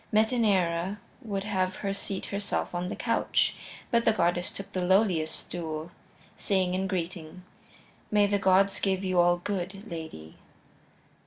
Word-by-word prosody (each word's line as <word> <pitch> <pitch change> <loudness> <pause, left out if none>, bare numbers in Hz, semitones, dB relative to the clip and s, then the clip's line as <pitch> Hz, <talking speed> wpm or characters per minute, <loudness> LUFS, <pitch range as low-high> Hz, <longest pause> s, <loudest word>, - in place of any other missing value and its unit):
Metaneira 205 -5 +2 0.2
would 200 -5 -3
have 190 -3 0
her 195 -1 -2
seat 195 -1 -3
herself 200 -2 -2
on 175 +1 -2
the - - -4
couch - - +1 0.4
but 235 -1 +3
the 225 - +5
goddess 175 -3 +1
took 195 - -7
the 185 - -1
lowliest 180 -4 +3
stool, 160 -1 -5 0.4
saying 185 -2 +1
in 190 +1 0
greeting: 180 -2 -4 0.7
"May 210 -1 +4
the 205 0 +1
gods 195 +1 +4
give 190 -1 0
you 185 -1 +1
all 175 0 +5
good, 195 +3 -4
lady." 160 - -8
190 Hz, 145 wpm, -28 LUFS, 175-200 Hz, 0.7 s, the